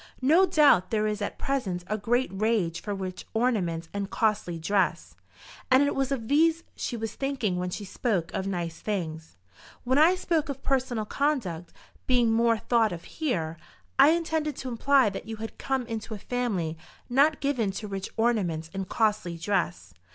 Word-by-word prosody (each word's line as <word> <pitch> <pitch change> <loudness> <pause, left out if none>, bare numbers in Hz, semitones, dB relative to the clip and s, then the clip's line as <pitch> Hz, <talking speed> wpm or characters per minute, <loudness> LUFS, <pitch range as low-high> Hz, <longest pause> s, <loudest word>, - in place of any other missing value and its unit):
No 330 +8 +5
doubt 290 - +5
there 215 -1 +1
is 210 -1 -1
at 205 - -3
present 205 -11 -2
a 215 - -2
great 240 +5 0
rage 195 -5 0
for 205 -1 -3
rich 185 -1 -6
ornaments 185 -9 0
and 200 -1 -3
costly 210 -7 0
dress, 195 +4 0 0.5
and 260 +2 +6
it 285 - +1
was 270 0 -1
of 235 -5 -2
these 325 +4 +3
she 240 - -3
was 225 0 -4
thinking 265 -10 -1
when 180 0 -2
she 205 +3 -5
spoke 190 -4 -1
of 190 - -2
nice 170 -4 -3
things. 160 - -4 0.5
When 260 +3 +2
I 335 +4 +6
spoke 330 -5 0
of 275 -1 -5
personal 255 -5 0
conduct 210 - -1 0.4
being 245 -3 +3
more 230 0 +3
thought 225 0 +2
of 170 -1 -6
here, 165 - -2 0.4
I 275 +2 +9
intended 320 -2 0
to 260 - -5
imply 255 -1 +3
that 195 - -7
you 225 - -4
had 220 +1 -8
come 265 -2 -1
into 225 -1 -5
a - - -6
family 195 -9 -2 0.3
not 285 +5 +3
given 255 -7 0
to 210 +2 -5
rich 195 -1 -4
ornaments 180 -9 0
and 190 -1 -4
costly 210 -6 0
dress. 95 - -2
220 Hz, 175 wpm, -27 LUFS, 185-265 Hz, 0.5 s, I